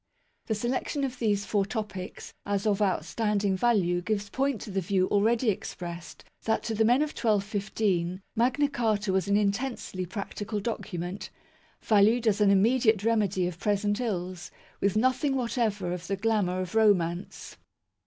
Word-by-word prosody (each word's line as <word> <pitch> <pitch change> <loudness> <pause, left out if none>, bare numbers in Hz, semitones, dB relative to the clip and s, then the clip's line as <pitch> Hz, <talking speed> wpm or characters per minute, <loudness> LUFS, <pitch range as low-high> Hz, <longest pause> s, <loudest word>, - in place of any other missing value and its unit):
The 220 - 0
selection 255 +5 -2
of 255 -2 -3
these 205 -3 +1
four 200 0 +1
topics 205 -3 -6
as 200 0 -1
of 210 -1 +1
outstanding 205 +1 0
value 185 -5 +2
gives 200 +1 -2
point 270 -3 0
to 210 - -7
the 195 0 0
view 185 +1 +1
already 225 +3 +3
expressed 175 -3 -7 0.2
that 220 0 +1
to 225 - -2
the 220 +1 +2
men 245 +6 +4
of 305 - -3
1215 200 -4 -1
Magna 255 +5 +2
Carta 215 -7 0
was 190 -1 +1
an 200 0 +3
intensely 200 -3 -2
practical 205 +2 -4
document, 195 -3 -4 0.5
valued 220 +3 +4
as 210 -1 +2
an 205 - +5
immediate 220 +1 +3
remedy 205 -5 +1
of 175 -1 -6
present 205 +1 0
ills, 185 -6 -3 0.3
with 200 +1 +1
nothing 260 +4 +2
whatever 225 -7 -1
of 180 0 -6
the 195 - 0
glamour 195 -3 0
of 185 +3 -5
romance. 190 -5 +1
205 Hz, 155 wpm, -28 LUFS, 190-225 Hz, 0.5 s, an